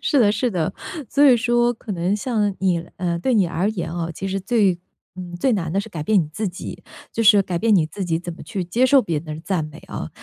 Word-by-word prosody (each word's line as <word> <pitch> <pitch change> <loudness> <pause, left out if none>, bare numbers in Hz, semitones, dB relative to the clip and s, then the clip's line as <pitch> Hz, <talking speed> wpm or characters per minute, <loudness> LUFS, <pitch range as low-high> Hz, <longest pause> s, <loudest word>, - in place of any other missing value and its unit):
是 285 -4 +3
的 205 - +5
是 245 +4 0
的， 165 -4 -1 0.4
所 285 - +4
以 255 -3 +7
说 240 0 +2
可 225 - -10
能 180 +1 0
像 210 -3 0
你 185 -3 +2 0.2
呃， 175 -2 -1
对 245 +8 +1
你 200 -4 +4
而 175 +4 0
言 180 -6 -3
啊， 170 -1 -3
其 195 +4 -4
实 195 +1 -1
最 200 -4 +2 0.4
嗯， 180 -1 -7
最 265 - +1
难 170 -7 -1
地 195 - +1
是 215 - -8
改 170 -7 -6
变 205 +2 +4
你 - - -5
自 215 +4 -2
己， 180 - -8 0.3
就 230 - -1
是 210 -1 +7
改 180 -2 -3
变 225 +2 +2
你 165 -5 +4
自 190 +5 -5
己 165 -2 0
怎 175 -1 -6
么 - - -15
去 200 -5 -3
接 230 +9 +1
受 275 +1 +6
别 170 -7 -2
人 155 - -9
的 155 - -8
赞 180 -6 0
美 150 - -10
啊。 - - -5
195 Hz, 280 characters per minute, -22 LUFS, 175-225 Hz, 0.4 s, 以